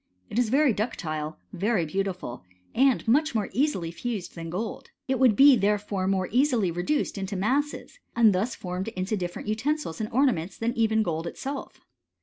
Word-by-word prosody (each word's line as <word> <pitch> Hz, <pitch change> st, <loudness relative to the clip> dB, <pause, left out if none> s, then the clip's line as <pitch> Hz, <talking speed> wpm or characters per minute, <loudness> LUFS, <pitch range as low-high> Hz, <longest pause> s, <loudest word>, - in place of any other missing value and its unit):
It 230 Hz, -, 0 dB
is 240 Hz, -3 st, +2 dB
very 275 Hz, 0 st, +4 dB
ductile, 155 Hz, -8 st, -3 dB, 0.2 s
very 195 Hz, -1 st, +1 dB
beautiful, 180 Hz, -, -3 dB, 0.3 s
and 265 Hz, -1 st, +3 dB
much 290 Hz, +4 st, +3 dB
more 210 Hz, -2 st, 0 dB
easily 250 Hz, -, 0 dB
fused 210 Hz, +1 st, -4 dB
than 165 Hz, -1 st, -7 dB
gold: 220 Hz, +9 st, -5 dB, 0.2 s
it 265 Hz, -2 st, 0 dB
would 250 Hz, -5 st, +5 dB
be 275 Hz, +4 st, +8 dB
therefore 205 Hz, -2 st, 0 dB
more 190 Hz, -1 st, +1 dB
easily 245 Hz, -, +2 dB
reduced 200 Hz, -, -1 dB
into 195 Hz, +1 st, -4 dB
masses, 275 Hz, -, -1 dB, 0.2 s
and 225 Hz, -4 st, +5 dB, 0.2 s
formed 180 Hz, 0 st, -5 dB
into 200 Hz, -1 st, -2 dB
different 175 Hz, 0 st, -5 dB
utensils 230 Hz, -, -1 dB
and 215 Hz, -, -2 dB
orna 265 Hz, +1 st, +4 dB
ments 170 Hz, +2 st, -6 dB
than 230 Hz, +1 st, -1 dB
even 220 Hz, -1 st, +2 dB
gold 165 Hz, -2 st, -2 dB
itself. 275 Hz, +10 st, -6 dB
215 Hz, 165 wpm, -26 LUFS, 185-255 Hz, 0.3 s, be